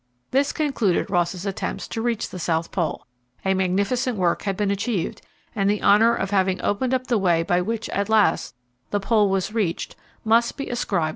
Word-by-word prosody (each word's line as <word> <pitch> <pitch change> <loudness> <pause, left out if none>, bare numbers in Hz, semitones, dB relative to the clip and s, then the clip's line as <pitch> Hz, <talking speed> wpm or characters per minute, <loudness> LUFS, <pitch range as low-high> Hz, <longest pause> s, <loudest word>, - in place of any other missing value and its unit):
This 275 +2 +2
concluded 250 - 0
Ross's 175 +1 0
attempts 195 -1 -3
to 225 - -3
reach 235 -2 -1
the 180 - -7
South 165 0 -1
Pole. 170 -5 -2 0.4
A 190 - +3
magnificent 200 +7 0
work 175 -2 +1
had 195 -2 -2
been 205 -1 +1
achieved, 200 -2 -2 0.3
and 200 -1 +1
the 210 0 0
honour 225 +3 +5
of 195 - -3
having 190 -2 +2
opened 250 +6 +1
up 255 0 -2
the 235 -4 +1
way 170 -3 +2
by 175 +1 +1
which, 225 +4 -3
at 200 +1 -1
last, 210 -11 +2 0.3
the 205 - 0
Pole 210 0 +2
was 195 +2 -1
reached 195 -7 -2 0.3
must 230 +2 +3
be 275 - -4
ascribed 240 -7 -1
to - - +1
Ross. - - -1
200 Hz, 200 wpm, -23 LUFS, 185-230 Hz, 0.4 s, honour